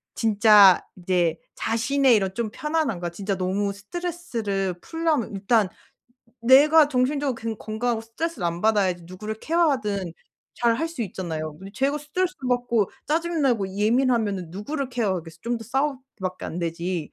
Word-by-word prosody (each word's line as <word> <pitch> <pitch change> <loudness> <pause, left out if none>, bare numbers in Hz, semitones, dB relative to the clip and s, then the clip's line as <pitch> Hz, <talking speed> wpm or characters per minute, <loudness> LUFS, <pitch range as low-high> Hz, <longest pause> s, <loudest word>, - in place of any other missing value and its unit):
진짜 210 -3 +6
이제 175 -3 0 0.2
자신의 255 +3 +2
이런 195 -3 0
좀 225 +1 -2
편안함과 285 - -1
진짜 195 +3 -3
너무 195 +2 -1
스트레스를 220 - -3
풀려면 325 -8 -1
일단 200 +2 +2 0.7
내가 290 +6 +6
정신적으로 275 +1 0
근 225 -1 -5
건강하고 225 +1 -2
스트레스를 230 - -4
안 170 +1 -3
받아야지 200 -5 +2
누구를 210 +5 -6
케어하든 220 - 0 0.5
잘 235 -1 +3
할 325 +7 -1
수 325 -7 -4
있잖아요. 160 -6 -5
근데 190 +2 -10
제가 280 +2 0
스트레스 355 +5 -2
받고 240 -4 +1 0.2
짜증 330 +1 0
나고 230 -8 +2
예민하면은 220 -4 +1
누구를 260 - -4
케어하겠어 185 -9 -2
좀 235 0 -1
더 225 - -10
싸우기밖에 260 -7 -3
안 170 - -5
되지. 170 -1 -3
225 Hz, 355 characters per minute, -24 LUFS, 190-275 Hz, 0.7 s, 진짜